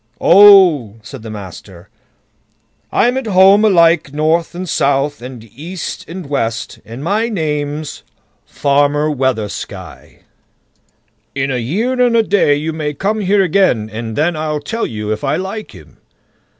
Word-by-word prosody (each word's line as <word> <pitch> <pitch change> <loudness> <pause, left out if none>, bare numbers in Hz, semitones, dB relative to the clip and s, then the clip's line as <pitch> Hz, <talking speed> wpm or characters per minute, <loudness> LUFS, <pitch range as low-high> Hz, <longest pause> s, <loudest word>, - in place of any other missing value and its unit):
"Oh!" 180 - +6
said 135 0 -10
the 110 - -9
master, 95 -3 -10 1.0
"I'm 245 +3 +1
at 265 -3 -4
home 195 +1 +5
alike 170 -7 +3
north 160 +4 0
and 185 +1 -5
south, 145 -2 0
and 125 -2 -9
east 160 - -8
and 180 0 -7
west, 115 -6 -3
and 120 +5 -9
my 215 +7 0
name's 150 -5 -4 0.4
Farmer 145 +2 0
Weathersky. 110 - -5 1.1
In 135 0 -1
a 125 - -1
year 220 - -1
and 240 -2 +3
a 225 - +4
day 195 -8 +2
you 155 +2 -3
may 150 -2 -4
come 205 +8 -2
here 200 0 +2
again, 155 - +1
and 110 0 -5
then 160 +3 0
I'll 155 -1 -3
tell 225 +11 -4
you 105 -1 -5
if 110 - -4
I 135 - 0
like 195 +4 -5
him." - - -16
150 Hz, 145 wpm, -15 LUFS, 130-190 Hz, 1.1 s, Oh